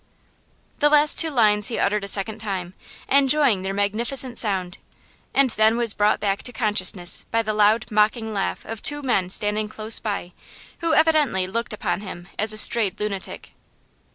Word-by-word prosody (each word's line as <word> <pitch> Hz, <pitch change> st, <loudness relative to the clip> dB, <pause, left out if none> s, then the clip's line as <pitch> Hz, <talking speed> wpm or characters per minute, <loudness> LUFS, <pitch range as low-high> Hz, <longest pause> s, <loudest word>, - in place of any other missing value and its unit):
The 295 Hz, -, +4 dB
last 300 Hz, 0 st, +4 dB
two 325 Hz, -, +6 dB
lines 215 Hz, -6 st, +2 dB
he 235 Hz, -, -2 dB
uttered 210 Hz, 0 st, 0 dB
a -, -, -5 dB
second 210 Hz, +2 st, -1 dB
time, 190 Hz, -4 st, -5 dB, 0.3 s
enjoying 275 Hz, -6 st, +3 dB
their 190 Hz, +1 st, -4 dB
magnificent 235 Hz, +6 st, -1 dB
sound, 190 Hz, -4 st, -1 dB, 0.5 s
and 275 Hz, -2 st, +2 dB
then 220 Hz, +1 st, +2 dB
was 235 Hz, -3 st, -1 dB
brought 210 Hz, +1 st, +1 dB
back 195 Hz, -1 st, -2 dB
to 245 Hz, -, -6 dB
consciousness 195 Hz, -6 st, +1 dB
by 230 Hz, 0 st, 0 dB
the 215 Hz, -1 st, -3 dB
loud 215 Hz, +2 st, +2 dB
mocking 220 Hz, +1 st, 0 dB
laugh 195 Hz, -2 st, -3 dB
of 225 Hz, -1 st, -7 dB
two 290 Hz, -1 st, +3 dB
men 195 Hz, -9 st, 0 dB
standing 210 Hz, +2 st, -1 dB
close 215 Hz, +1 st, +2 dB
by, 200 Hz, -5 st, -5 dB, 0.5 s
who 330 Hz, -2 st, 0 dB
evidently 305 Hz, -, +2 dB
looked 230 Hz, +5 st, -4 dB
upon 210 Hz, -2 st, -3 dB
him 175 Hz, -3 st, -9 dB
as 215 Hz, +1 st, +1 dB
a 215 Hz, -, -1 dB
strayed 220 Hz, -2 st, +1 dB
lunatic. 200 Hz, -2 st, -5 dB
215 Hz, 170 wpm, -22 LUFS, 200-240 Hz, 0.5 s, two